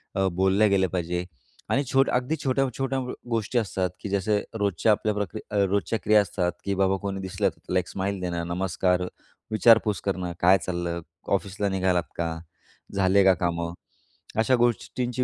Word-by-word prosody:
अ, 95 -1 +2
बोलल्या 95 +4 +3
गेलं 95 -2 +3
पाहिजे 90 0 -2 0.4
आणि 140 - +2
छोट्या 135 -1 +3
अगदी, 125 +5 0
छोट्या-छोट्या 135 0 0 0.3
गोष्टी 115 +1 -1
असतात 95 -4 -1
की 100 - -6
जसं 100 +2 +1 0.2
रोजच्या 100 +1 +2
आपल्या 105 0 +1
प्रक्रि 105 +1 -3
अ, - - -3
रोजच्या 100 +3 0
क्रिया 105 0 +5
असतात 90 -3 -1
की 100 0 -1
बाबा 95 0 +2
कोणी 100 -1 -3
दिसलं 95 -1 0
तर - - -18
लाइक 90 -1 +1
स्माईल 100 +1 -3
देणं. 85 -2 -2
नमस्कार, 90 +1 0 0.5
विचारपूस 110 -3 +4
करणं, 90 -3 -2
काय 95 +2 +6
चाललं? 85 -1 -2 0.3
ऑफिसला 100 +1 -1
निघालात 95 -2 +1
का? 80 -1 -2 0.6
झाले 100 0 +4
का 95 0 +6
कामं? 85 -1 -2 0.7
अशा 120 +4 +4
गोष्टींची 120 +1 0
95 Hz, 160 wpm, -26 LUFS, 90-110 Hz, 0.7 s, काय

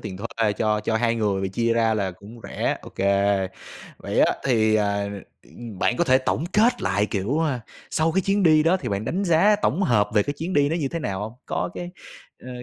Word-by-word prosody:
tiền 95 - -7
thuê 115 0 -1
cho 105 0 0
cho 110 +1 -1
2 115 0 +1
người 100 -4 -1
chia 115 +4 0
ra 115 -1 +2
là 100 -3 -1
cũng 100 +6 -13
rẻ, - - -2
OK. - - -14 1.0
Vậy - - -1
á, - - +4
thì, 110 -4 +3
à, 100 -1 0 0.4
ừm, 115 -5 -11
bạn 120 - +1
có 175 - +2
thể 130 -4 +4
tổng 135 +3 -1
kết 225 +4 +3
lại, 100 +2 +1
kiểu, 105 +10 -1
a, 145 -6 -1 0.3
sau 160 +1 +1
cái 190 - +2
chuyến 195 +2 0
đi 155 -3 +5
đó 170 +4 +3
thì - - -5
bạn 100 +1 -2
đánh 190 - -2
giá 190 +4 +4
tổng 195 - +1
hợp 105 - +2
về 105 - +4
cái 145 - -3
chuyến 170 +4 -4
đi 145 -4 +3
nó 165 - -1
như 145 -5 -1
thế 170 - -4
nào 95 -12 -3
hông? 105 +1 -5
Có - - -2
cái, 175 0 -6 0.5
ờ, 130 - -11
115 Hz, 230 wpm, -23 LUFS, 105-160 Hz, 1.0 s, đi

